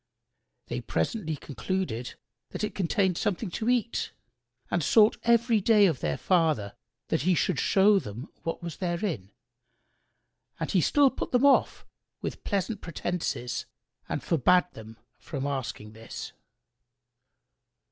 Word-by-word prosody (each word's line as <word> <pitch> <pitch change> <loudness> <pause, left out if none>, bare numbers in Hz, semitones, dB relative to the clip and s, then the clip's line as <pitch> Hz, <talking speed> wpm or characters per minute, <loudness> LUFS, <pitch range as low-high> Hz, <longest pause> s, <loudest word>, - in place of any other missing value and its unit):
They - - -4
presently 175 -10 -2
concluded 145 -4 -4 0.3
that - - -5
it 210 - -1
contained 190 -1 +1
something 205 -1 -1
to 225 +6 -2
eat 240 -2 0 0.6
and 175 - +1
sought 215 +8 +5
every 235 -1 +3
day 210 0 +5
of 160 -9 +1
their - - -1
father 155 - +1 0.4
that - - +1
he 180 +4 +3
should - - +1
show 200 +1 +4
them 115 - -7
what 165 +1 -4
was 170 -2 -5
therein; 175 - -2 1.3
and - - -2
he 185 - +3
still 280 - +4
put - - -5
them 250 +2 +3
off 280 - +3 0.3
with - - -5
pleasant 200 +1 -2
pretences 170 -7 -3 0.4
and - - -2
forbade 180 +3 +3
them 110 0 -11 0.2
from 140 -4 -5
asking 130 -6 -4
this. 110 +1 -8
180 Hz, 130 wpm, -28 LUFS, 140-210 Hz, 1.3 s, sought